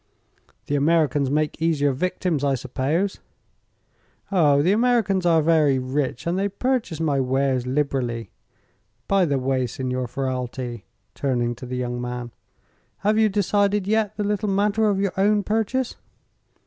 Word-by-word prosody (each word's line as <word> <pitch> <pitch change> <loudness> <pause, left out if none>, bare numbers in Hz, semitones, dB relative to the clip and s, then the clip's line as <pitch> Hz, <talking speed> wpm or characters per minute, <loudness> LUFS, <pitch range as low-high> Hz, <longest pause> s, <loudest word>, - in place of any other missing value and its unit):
"The - - -3
Americans 145 -2 +2
make 150 +2 -1
easier 150 -4 +2
victims, 170 +1 -1
I 140 -1 +2
suppose." 140 - -2 1.1
"Oh, 145 -7 +4
the 180 - +3
Americans 210 -5 +2
are 165 -2 +4
very 155 -4 +3
rich, 130 0 -2
and 175 +2 0
they 200 +1 0
purchase 225 -5 -1
my 150 -4 +1
wares 130 -1 0
liberally. 130 -4 -1 0.8
By 195 -2 +3
the 140 -4 0
way, 130 -1 0
Signor 130 +1 -3
Ferralti," 125 -2 -4 0.3
turning 120 -3 -1
to 120 +2 -10
the 125 0 -4
young 120 -1 -3
man, 125 -1 -5 0.7
"have 215 +1 +3
you 220 -1 +4
decided 205 0 +1
yet 215 0 0
the 210 - -1
little 205 0 -1
matter 210 +2 +2
of 195 -1 0
your 200 -1 0
own 205 +1 +3
purchase?" 225 +5 -1
150 Hz, 145 wpm, -23 LUFS, 130-200 Hz, 1.1 s, Oh